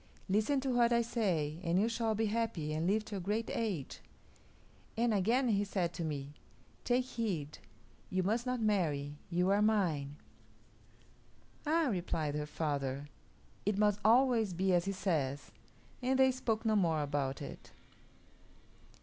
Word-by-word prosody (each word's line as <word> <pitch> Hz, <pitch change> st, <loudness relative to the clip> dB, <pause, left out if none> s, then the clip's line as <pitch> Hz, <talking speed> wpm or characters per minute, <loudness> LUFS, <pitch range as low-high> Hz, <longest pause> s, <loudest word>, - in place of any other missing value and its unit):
Listen 215 Hz, +8 st, +2 dB
to 265 Hz, 0 st, -1 dB
what 240 Hz, -1 st, +3 dB
I 235 Hz, 0 st, +3 dB
say, 175 Hz, -10 st, -1 dB
and 170 Hz, +1 st, +2 dB
you 215 Hz, -, +3 dB
shall 225 Hz, -1 st, 0 dB
be 220 Hz, +1 st, +1 dB
happy 210 Hz, -9 st, -1 dB
and 160 Hz, +2 st, -1 dB
live 210 Hz, +3 st, +1 dB
to 215 Hz, -2 st, -5 dB
a -, -, -3 dB
great 210 Hz, +5 st, -2 dB
age.' 200 Hz, -, -3 dB, 1.0 s
And 235 Hz, 0 st, +2 dB
again 235 Hz, +6 st, +2 dB
he 205 Hz, -2 st, +2 dB
said 185 Hz, -4 st, -1 dB
to 170 Hz, -, -4 dB
me, 145 Hz, -2 st, -4 dB, 0.5 s
'Take 250 Hz, +1 st, +2 dB
heed, 190 Hz, -, -3 dB, 0.5 s
you 185 Hz, 0 st, 0 dB
must 230 Hz, +6 st, 0 dB
not 250 Hz, 0 st, 0 dB
marry; 150 Hz, -9 st, 0 dB
you 180 Hz, +2 st, +2 dB
are 200 Hz, +1 st, +3 dB
mine.'" 170 Hz, -10 st, +1 dB, 1.5 s
"Ah!" 320 Hz, 0 st, +3 dB
replied 165 Hz, -5 st, -1 dB
her 150 Hz, 0 st, -3 dB
father; 145 Hz, -2 st, -2 dB, 0.5 s
"it 205 Hz, 0 st, 0 dB
must 210 Hz, -1 st, +3 dB
always 230 Hz, -2 st, +4 dB
be 185 Hz, +2 st, +1 dB
as 175 Hz, 0 st, +3 dB
he 195 Hz, -, 0 dB
says"; 155 Hz, -8 st, -2 dB, 0.5 s
and 260 Hz, +1 st, +1 dB
they 265 Hz, 0 st, +5 dB
spoke 230 Hz, -3 st, -2 dB
no 220 Hz, -1 st, +3 dB
more 165 Hz, -6 st, +2 dB
about 140 Hz, -2 st, -2 dB
it. -, -, -9 dB
195 Hz, 155 wpm, -33 LUFS, 155-225 Hz, 1.5 s, they